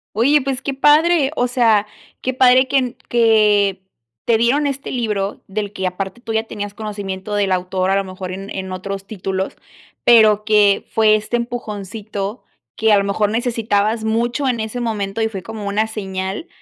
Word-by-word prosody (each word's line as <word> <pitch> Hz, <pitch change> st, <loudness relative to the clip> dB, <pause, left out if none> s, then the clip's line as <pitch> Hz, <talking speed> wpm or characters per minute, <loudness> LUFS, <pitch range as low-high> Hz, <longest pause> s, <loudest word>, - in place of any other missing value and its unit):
Oye, 280 Hz, +7 st, +4 dB
pues 270 Hz, 0 st, -3 dB
qué 275 Hz, -, -3 dB
padre, 295 Hz, +1 st, +4 dB
o 245 Hz, -, +1 dB
sea, 230 Hz, -4 st, +3 dB, 0.4 s
qué 260 Hz, -, -1 dB
padre 255 Hz, 0 st, +5 dB
que 275 Hz, -, +2 dB
en 255 Hz, -2 st, -1 dB
que 210 Hz, -4 st, +3 dB, 0.4 s
te 230 Hz, -1 st, +3 dB
dieron 270 Hz, +6 st, +2 dB
este 275 Hz, 0 st, -4 dB
libro 210 Hz, -5 st, -2 dB
del 205 Hz, 0 st, -4 dB
que 190 Hz, -2 st, -2 dB
aparte 190 Hz, +5 st, -5 dB
tú 225 Hz, -2 st, -5 dB
ya 220 Hz, 0 st, +1 dB
tenías 205 Hz, -2 st, -6 dB
conocimiento 205 Hz, -2 st, -5 dB
del 200 Hz, -2 st, +1 dB
autor, 185 Hz, +1 st, 0 dB
a -, -, +3 dB
lo 195 Hz, -, +1 dB
mejor 185 Hz, -1 st, -7 dB
en 195 Hz, +2 st, -7 dB
en 190 Hz, -1 st, -5 dB
otros 195 Hz, +1 st, -5 dB
títulos, 190 Hz, -2 st, -4 dB, 0.5 s
pero 215 Hz, -3 st, +6 dB
que 210 Hz, -2 st, +3 dB
fue 215 Hz, -1 st, +4 dB
este 215 Hz, +3 st, -1 dB
empujoncito 215 Hz, -2 st, -5 dB, 0.3 s
que, 220 Hz, 0 st, +2 dB
a 210 Hz, -, +6 dB
lo 200 Hz, -, +2 dB
mejor 200 Hz, +1 st, 0 dB
necesitabas 225 Hz, -2 st, 0 dB
mucho 235 Hz, +5 st, 0 dB
en 245 Hz, -3 st, 0 dB
ese 220 Hz, +3 st, -4 dB
momento 215 Hz, -3 st, -2 dB
y 220 Hz, -, +1 dB
fue 195 Hz, -4 st, -6 dB
como 220 Hz, -2 st, -7 dB
una 215 Hz, +2 st, 0 dB
señal, 190 Hz, -, -4 dB
215 Hz, 180 wpm, -19 LUFS, 195-240 Hz, 0.5 s, pero